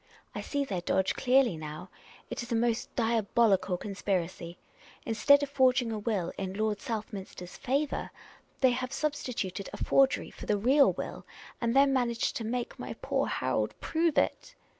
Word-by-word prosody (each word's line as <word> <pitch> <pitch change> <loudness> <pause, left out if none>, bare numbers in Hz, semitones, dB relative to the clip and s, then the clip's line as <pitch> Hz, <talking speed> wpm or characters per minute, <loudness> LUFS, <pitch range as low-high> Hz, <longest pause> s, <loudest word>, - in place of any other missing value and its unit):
I - - -4
see 285 -1 -2
their 190 -8 -3
dodge 190 +2 +1
clearly 255 -5 +3
now. 155 +4 -8 0.4
It - - -3
is 240 +1 -8
a - - +2
most 230 0 0
diabolical 215 -5 +2
conspiracy. 180 -3 -3 0.5
Instead 280 +6 +4
of 285 - -3
forging 255 -3 +3
a 215 - -3
will 205 -5 -1
in 190 -1 -4
Lord 210 -1 -1
Southminster's 205 -5 -6
favour, 280 +3 -1 0.5
thej' 255 -1 +6
ha/e 255 0 -3
sub 305 +2 -1
stituted 205 -9 -4
a - - -7
forgery 270 -1 +2
for - - -10
the 210 - +2
real 265 +7 +5
will, - - -6 0.3
and 235 +1 0
then 275 0 +5
managed 235 -3 0
to 230 - -4
make 240 +2 -3
my - - -5
poor - - 0
Harold - - -1
prove 330 -1 0
it." - - 0
230 Hz, 165 wpm, -30 LUFS, 195-260 Hz, 0.5 s, thej